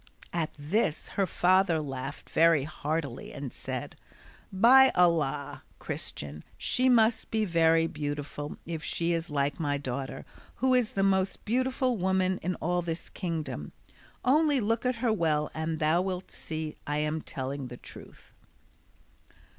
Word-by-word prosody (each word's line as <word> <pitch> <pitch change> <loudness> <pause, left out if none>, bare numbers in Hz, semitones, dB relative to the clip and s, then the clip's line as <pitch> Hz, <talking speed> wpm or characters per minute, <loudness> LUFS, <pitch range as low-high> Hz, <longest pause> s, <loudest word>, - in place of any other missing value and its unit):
At 165 -2 0
this 155 +3 0
her 195 -2 0
father 180 -1 +3
laughed 135 -1 -6
very 165 -3 +4
heartily 150 -2 -4
and 140 -3 -6
said, - - -5 0.6
"By 250 +7 +7
Allah, 150 -5 +1 0.2
Christian, 75 +1 -4
she 255 +1 +2
must 230 -2 +3
be 220 -1 +1
very 165 -2 +4
beautiful 145 -1 -4
if 165 -1 -5
she 170 0 0
is 165 +1 -2
like 145 +1 -1
my 145 -3 0
daughter, 135 -1 -5 0.3
who 260 +1 +2
is 250 -3 +3
the 195 - +1
most 190 -1 +1
beautiful 255 +1 +1
woman 190 0 +1
in 180 +1 -1
all 175 +2 0
this 165 -1 -5
kingdom: 160 - -4 0.5
only 295 +1 +4
look 230 +2 0
at 250 - +1
her 225 - +3
well 155 -6 +1
and 160 0 -2
thou 155 +2 +2
wilt 185 -1 -4
see 155 -1 -5
I 145 0 0
am 150 +1 -1
telling 135 -1 -5
the 120 0 -9
truth." - - -14
165 Hz, 145 wpm, -29 LUFS, 150-195 Hz, 0.6 s, By